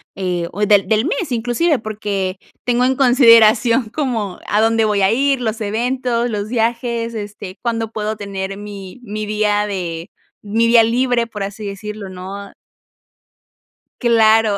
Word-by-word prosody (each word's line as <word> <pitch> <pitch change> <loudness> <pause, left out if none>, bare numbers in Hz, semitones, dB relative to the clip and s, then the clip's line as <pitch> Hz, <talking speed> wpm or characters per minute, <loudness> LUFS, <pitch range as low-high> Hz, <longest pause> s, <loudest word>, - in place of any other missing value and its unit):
eh, 180 -3 -2
o 205 - -5
del 200 -2 +4
del 220 +4 +2
mes 365 - -2
inclusive, 245 +7 +1
porque, 205 -4 -3 0.3
tengo 245 0 +1
en 260 +1 +2
consideración 235 -2 +5
como 225 -8 -3
a 210 - +1
dónde 225 0 +3
voy 210 -2 +1
a 190 - +4
ir, 275 +2 +2
los 225 -1 -2
eventos, 240 +2 -1
los 210 0 -3
viajes, 235 0 -1
este, 205 -3 -7
cuándo 225 -2 -2
puedo 215 0 -3
tener 195 -1 -5
mi 205 +1 -9
mi 215 -1 -5
día 210 -1 +1
de, 175 -3 -4 0.3
mi 225 +3 0
día 230 0 +6
libre, 240 +1 +1
por 210 -3 -6
así 205 +2 -6
decirlo, 200 0 -7
¿no? 195 +2 -8 1.5
Claro. 225 -3 +4
220 Hz, 150 wpm, -18 LUFS, 205-235 Hz, 1.5 s, día